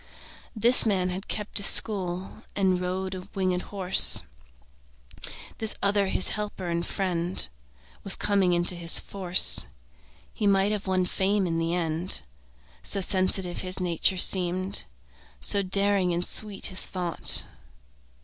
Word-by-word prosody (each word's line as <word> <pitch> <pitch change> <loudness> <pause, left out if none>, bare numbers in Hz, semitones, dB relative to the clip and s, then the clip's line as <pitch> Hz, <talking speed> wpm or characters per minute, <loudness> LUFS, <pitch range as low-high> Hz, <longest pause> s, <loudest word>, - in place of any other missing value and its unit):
This 235 +2 +5
man 185 -3 -3
had 185 +3 -7
kept 210 0 -5
a - - -7
school 190 0 +2
And 185 -2 -2
rode 185 +1 -7
our 185 - -10
winged 185 -2 -4
horse. 190 -2 +7 1.4
This 220 -1 0
other 200 0 -2
his 190 - 0
helper 210 -3 -7
and 170 0 -4
friend 180 - -3 0.6
Was 195 - +4
coming 200 -3 -2
into 175 +1 -1
his 170 -1 +4
force; 185 -2 +4 0.7
He 210 - -5
might 195 +1 -1
have 205 -2 -7
won 185 -1 -2
fame 195 +2 -3
in 165 -2 -5
the 165 +1 -4
end, 165 - -4 0.6
So - - -4
sensitive 185 -1 -1
his 185 0 -4
nature 180 +1 -2
seemed, 185 +1 +2 0.5
So 200 - +2
daring 195 -2 -2
and 175 +1 -3
sweet 210 -2 0
his 185 - 0
thought. 175 -3 -3
185 Hz, 135 wpm, -22 LUFS, 180-200 Hz, 1.4 s, horse